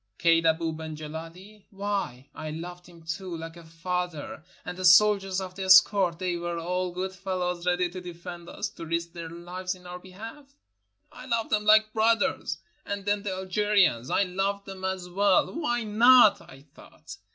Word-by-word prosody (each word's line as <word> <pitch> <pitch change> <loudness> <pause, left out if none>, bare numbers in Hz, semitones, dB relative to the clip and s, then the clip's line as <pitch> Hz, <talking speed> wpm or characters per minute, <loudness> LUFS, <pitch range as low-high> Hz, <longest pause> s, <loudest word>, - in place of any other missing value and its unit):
Kaid 165 -1 +3
Abou 160 0 +1
ben 160 0 -7
Gileli? 165 +7 -10
Why, 195 -10 -4
I 155 - -6
loved 175 +3 -8
him 170 -1 -16
too, 170 +2 -5
Kke 165 +1 -8
a 170 - -12
father. 165 -1 -4 0.2
And - - -5
the 185 - -7
soldiers 195 +1 +5
of 185 -1 -6
the 190 0 -5
escort! 185 -1 +6
They 180 -1 -2
were 170 0 -4
all 180 +2 -2
good 185 +2 -4
fellows, 180 -2 -3
ready 180 0 +2
to 185 0 -7
defend 175 0 -9
us, - - -4
to 165 - -10
risk 170 +1 -2
their 170 -2 -7
lives 180 +2 -5
in 180 -1 -18
our 180 0 -8
behalf. 225 +10 -11 0.6
I 250 +1 -11
loved 230 -2 -1
them 210 -1 +1
like 215 0 +5
brothers. 225 - +1 0.3
And 200 -1 -5
then 205 0 +1
the 200 -2 -3
Algerians! 190 - +1
I - - +2
loved 195 +2 -2
them 190 -1 -9
as 190 -1 -3
well. 195 +1 +2
"Why 240 -7 -1
not?" 230 +1 +6
I 135 +1 -15
thought. - - -13
185 Hz, 180 wpm, -27 LUFS, 170-200 Hz, 0.6 s, escort